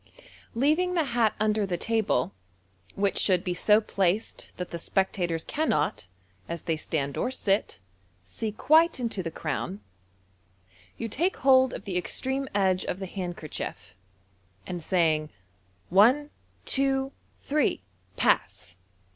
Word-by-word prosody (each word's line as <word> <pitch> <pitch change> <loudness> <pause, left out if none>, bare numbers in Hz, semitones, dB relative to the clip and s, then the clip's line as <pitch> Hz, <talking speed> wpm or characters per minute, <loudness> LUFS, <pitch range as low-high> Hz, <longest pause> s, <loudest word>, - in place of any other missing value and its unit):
Leaving 310 +9 +2
the 330 - +3
hat 235 -5 +1
under 215 0 +2
the 185 -3 -1
table, 215 - 0 0.6
which 200 0 +1
should 185 -2 +2
be 180 -3 -1
so 210 +4 +4
placed 200 -1 -1
that 180 - -5
the 170 - -4
spectators 175 -3 0
cannot, 155 - -1 0.4
as 170 0 -5
they 165 -2 0
stand 145 -3 -2
or - - 0
sit, 205 -6 0 0.5
see 215 - -4
quite 315 +8 +4
into 230 -5 -2
the 170 - -3
crown, 155 - -4 1.2
you 230 - -3
take 335 - 0
hold 260 -1 +6
of - - -7
the 190 -3 -2
extreme 265 +8 -2
edge 190 -2 +2
of - - -2
the 190 - -5
handkerchief, 175 - -6 0.7
and 175 -1 -5
saying, 155 -3 +1 0.6
"One, 250 +11 +5 0.3
two, 270 0 +1 0.3
three! 290 - 0 0.3
Pass!" - - +1
200 Hz, 130 wpm, -27 LUFS, 175-260 Hz, 1.2 s, hold